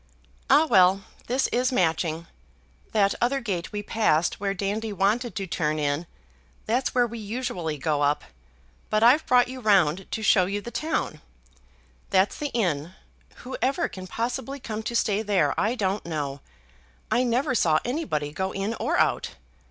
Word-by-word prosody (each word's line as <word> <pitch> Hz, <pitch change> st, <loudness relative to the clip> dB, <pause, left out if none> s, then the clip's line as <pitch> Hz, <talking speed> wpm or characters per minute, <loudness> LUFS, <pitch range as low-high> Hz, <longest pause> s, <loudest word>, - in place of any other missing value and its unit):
Ah, 290 Hz, +4 st, +6 dB
well; 195 Hz, -6 st, +4 dB, 0.2 s
this 255 Hz, +3 st, +1 dB
is 250 Hz, +2 st, +1 dB
Matching. 165 Hz, -5 st, 0 dB, 0.7 s
That 200 Hz, -2 st, +3 dB
other 260 Hz, +3 st, +2 dB
gate 195 Hz, -9 st, -3 dB
we 205 Hz, -1 st, -4 dB
passed, 200 Hz, -7 st, +1 dB
where 195 Hz, 0 st, -1 dB
Dandy 205 Hz, +3 st, -2 dB
wanted 215 Hz, +5 st, 0 dB
to 195 Hz, -2 st, -2 dB
turn 155 Hz, -3 st, -1 dB
in, 145 Hz, +2 st, -1 dB, 0.6 s
that's 250 Hz, +4 st, 0 dB
where 245 Hz, -1 st, +4 dB
we 235 Hz, 0 st, -6 dB
usually 210 Hz, -, -3 dB
go 145 Hz, +1 st, 0 dB
up, 145 Hz, +1 st, +1 dB, 0.7 s
but 215 Hz, +1 st, +2 dB
I've 260 Hz, +7 st, +6 dB
brought 250 Hz, -1 st, +5 dB
you 255 Hz, +1 st, -7 dB
round 195 Hz, -6 st, +3 dB
to 220 Hz, -, -4 dB
show 185 Hz, -4 st, +4 dB
you 200 Hz, +2 st, -2 dB
the 235 Hz, +3 st, -8 dB
town. 240 Hz, -, -2 dB, 0.9 s
That's 190 Hz, +2 st, +2 dB
the 295 Hz, -, -2 dB
inn, 180 Hz, -, -1 dB, 0.5 s
whoever 265 Hz, +5 st, -1 dB
can 185 Hz, -1 st, -9 dB
possibly 250 Hz, +6 st, -3 dB
come 220 Hz, -4 st, -5 dB
to 235 Hz, +2 st, -4 dB
stay 210 Hz, -2 st, +1 dB
there 195 Hz, -9 st, +2 dB
I 220 Hz, +4 st, 0 dB
don't 200 Hz, -3 st, -1 dB
know; 145 Hz, -4 st, -4 dB, 0.7 s
I 245 Hz, -, +3 dB
never 255 Hz, +3 st, +1 dB
saw 165 Hz, -9 st, +3 dB
anybody 240 Hz, -, -2 dB
go 190 Hz, +5 st, -3 dB
in 195 Hz, +3 st, -2 dB
or -, -, 0 dB
out. -, -, +1 dB
205 Hz, 160 wpm, -25 LUFS, 175-245 Hz, 0.9 s, Ah